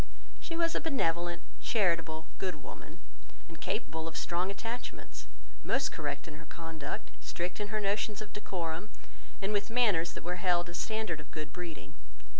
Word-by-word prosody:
She 330 - -3
was 335 -1 +4
a - - +2
benevolent, 175 - +2 0.2
charitable, 165 -7 +3
good 185 -3 +1
woman, - - -8 0.5
and - - -10
capable 160 +1 0
of 165 - -3
strong 175 +2 +2
attachments, 230 +4 -4 0.4
most 270 - +3
correct 145 -2 -2
in 150 -2 -6
her 165 - -9
conduct, 160 -2 -4
strict 175 +3 -1
in 210 - 0
her 215 +1 +1
notions 205 +1 +2
of 215 -2 -6
decorum, 175 -2 -2 0.5
and 200 +2 +2
with 205 +2 +2
manners 205 -9 +5
that - - -6
were 180 +1 0
held 175 -1 +4
a - - -5
standard 215 -4 0
of 150 - -9
good 155 -1 -4
breeding. 165 -5 -5
175 Hz, 165 wpm, -34 LUFS, 165-210 Hz, 0.5 s, manners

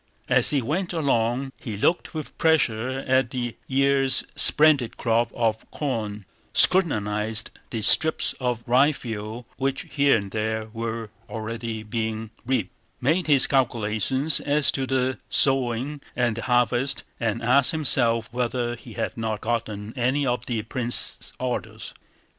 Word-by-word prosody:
As - - +4
he 140 -4 +1
went 175 +8 -2
along 135 -4 0
he 110 -4 -6
looked 170 - 0
with 155 -2 -6
pleasure 130 -5 +1
at 130 -1 +2
the 120 -2 -4
year's 135 0 +2
splendid 150 -6 +4
crop 115 0 +1
of 110 -2 0
corn, 110 -8 -4 0.3
scrutinized 110 - +3 0.2
the 115 -3 -4
strips 160 +8 +4
of 125 -3 -2
ryefield 120 -4 0
which 135 0 -1
here 140 -3 +3
and 100 -2 -6
there 110 0 -2
were 115 -1 -4 0.2
already 115 0 -5
being 110 0 -4 0.2
reaped, 120 -8 -1 0.3
made 160 +8 +1
his 140 -4 +6
calculations 130 +2 +1
as 145 0 +2
to 135 -1 -2
the 130 0 0
sowing 135 +1 +1
and 120 -3 +1
the - - -3
harvest, 125 +3 +1 0.2
and 115 0 -2
asked 125 +3 +4
himself 120 -7 +1
whether 120 -1 -1
he 115 0 -12
had - - -3
not 110 -2 -3
forgotten 110 -2 -3
any 130 +3 +1
of 125 -1 -2
the 115 -3 -2
prince's 120 0 +1
orders. 125 -1 -4
120 Hz, 135 wpm, -24 LUFS, 110-135 Hz, 0.3 s, his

